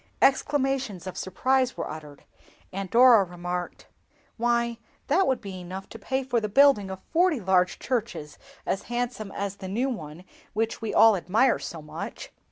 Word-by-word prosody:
Exclamations 270 - +1
of 185 - -6
surprise 255 +7 0
were - - -3
uttered, 150 -2 -9 0.5
and 195 0 -4
Dora 240 -2 +7
remarked—"Why, 195 +6 -4 0.3
that 375 +7 +2
would 260 - +1
be 195 -4 -7
enough 185 +2 -7
to 225 - -10
pay 265 +5 -2
for 245 -3 0
the 215 - -2
building 240 -4 +5
of 190 0 -7
forty 345 -4 +3
large 185 -2 +2
churches 230 - -3 0.3
as 195 - -1
handsome 240 -4 -3
as 200 0 -4
the 190 -2 -7
new 235 +8 0
one 165 - -7 0.3
which 225 +2 -1
we 225 - -2
all 225 -2 +6
admire 215 +8 +2
so 160 -2 -7
much." 150 - -7
215 Hz, 160 wpm, -26 LUFS, 185-255 Hz, 0.5 s, Dora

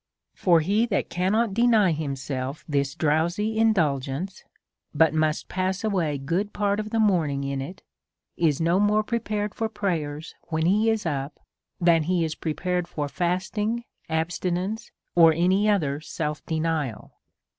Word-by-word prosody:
For 170 -3 +3
he 205 +8 +2
that 205 - -1
can 180 +2 0
not 220 -1 +1
deny 225 -4 +4
himself 140 -2 -4
this 140 -2 0
drowsy 170 +8 0
indulgence, 165 -5 0 0.5
but 160 0 +4
must 155 0 0
pass 185 +2 -2
away 175 -9 0
good 170 +9 -2
part 205 0 0
of 215 0 -4
the 225 - 0
morning 165 -10 +2
in 140 -1 -2
it, 165 +8 -8 0.5
is 155 -5 +1
no 170 +3 +2
more 210 +1 +3
prepared 210 -2 -2
for 225 -1 -2
prayer 160 -9 -2 0.3
when 160 -1 -1
he 210 +5 +3
is 220 -3 0
up 140 -2 -3 0.4
than 170 -2 +4
he 175 +2 +1
is 160 - -3
prepared 175 +3 -2
for 150 -4 -3
fasting, 190 +8 -1 0.3
abstinence, 180 +6 -2 0.2
or 165 -2 +7
any 185 +6 +2
other 150 -9 +1
self 150 -1 -4
denial. 160 -7 -2
175 Hz, 145 wpm, -25 LUFS, 155-205 Hz, 0.5 s, or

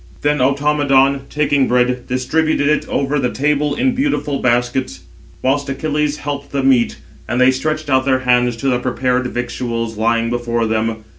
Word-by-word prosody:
Then 150 0 +1
Automedon, 140 0 +2
taking 145 -2 +1
bread, 125 0 +1
distributed 145 +4 0
it 150 0 +1
over 140 +1 0
the 125 -2 0
table 150 +1 0
in 260 -1 +1
beautiful 250 - -1
baskets; 120 +1 0 0.4
whilst 140 +2 0
Achilles 150 +1 -1
helped 140 -1 -5
the 140 -1 -1
meat, 130 -3 +2 0.3
and 120 +2 0
they 130 +1 +5
stretched 155 +3 -2
out 130 -2 +2
their 130 -1 +2
hands 125 -1 +2
to 135 - -3
the 125 -2 +2
prepared 125 0 -1
victuals 120 -2 -4
lying 115 +1 +1
before 120 -1 -1
them. 110 0 -1
130 Hz, 160 wpm, -17 LUFS, 125-145 Hz, 0.4 s, they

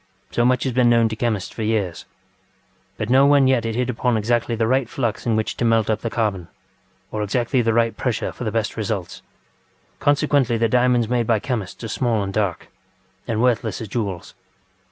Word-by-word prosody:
So 120 - +1
much 125 0 +2
has 130 - -1
been 125 -1 +4
known 115 -1 +4
to 110 - -4
chemists 110 -5 -2
for - - -7
years, 105 -6 -1 0.9
but 110 - -3
no 135 +2 +6
one 140 -1 +5
yet 130 -3 +2
had 115 -1 -2
hit 125 0 0
upon 125 -1 0
exactly 120 +2 0
the 115 0 0
right 130 +1 +1
flux 120 -3 -3
in 115 - +2
which 110 0 -1
to - - -2
melt 115 -2 +2
up 110 - -1
the 115 - -2
carbon, 105 -7 -2 0.6
or 105 - -3
exactly 120 +5 0
the 115 -1 +1
right 115 0 +1
pressure 125 -4 -2
for - - -8
the 110 - -2
best 110 -1 -1
results. 105 -5 -4 0.8
Consequently 145 -4 +2
the 115 0 +2
diamonds 125 0 +2
made 120 -1 0
by 115 - +3
chemists 110 -2 -4
are - - -3
small 115 -2 0
and 100 0 -4
dark, 100 -4 -2 0.6
and 115 0 0
worthless 120 -3 +1
as 110 - -7
jewels. 100 -6 -4
115 Hz, 200 wpm, -21 LUFS, 110-125 Hz, 0.9 s, no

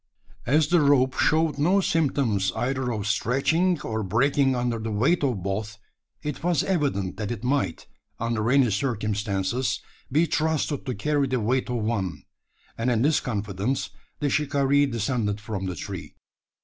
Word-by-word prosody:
As 150 +3 +3
the 175 -2 +4
rope 135 -3 +4
showed 155 -1 +2
no 180 +7 +4
symptoms 135 - +1
either 130 0 -1
of 105 -3 -3
stretching 150 - +1
or 110 -3 -3
breaking 135 +6 +2
under 120 -2 -1
the 110 +1 -4
weight 125 +11 +2
of 120 -10 0
both, 105 +3 -3 0.5
it 150 0 -4
was 175 -4 +2
evident 135 - -1
that 105 -1 -3
it 120 -2 -5
might, 130 - -1 0.3
under 115 -1 -1
any 130 -3 +4
circumstances, 105 0 -1 0.3
be 155 +5 +4
trusted 155 -3 -1
to 125 - -2
carry 145 +5 +1
the 130 -1 0
weight 125 +4 0
of 120 -3 -1
one; 100 -5 -2 0.6
and 115 +2 +1
in 120 -1 +2
this 150 +2 +3
confidence, 105 +1 -2 0.3
the 145 - 0
shikaree 145 -1 +2
descended 115 -3 -1
from 105 -2 -4
the 90 - -3
tree. - - -7
125 Hz, 155 wpm, -25 LUFS, 105-145 Hz, 0.6 s, the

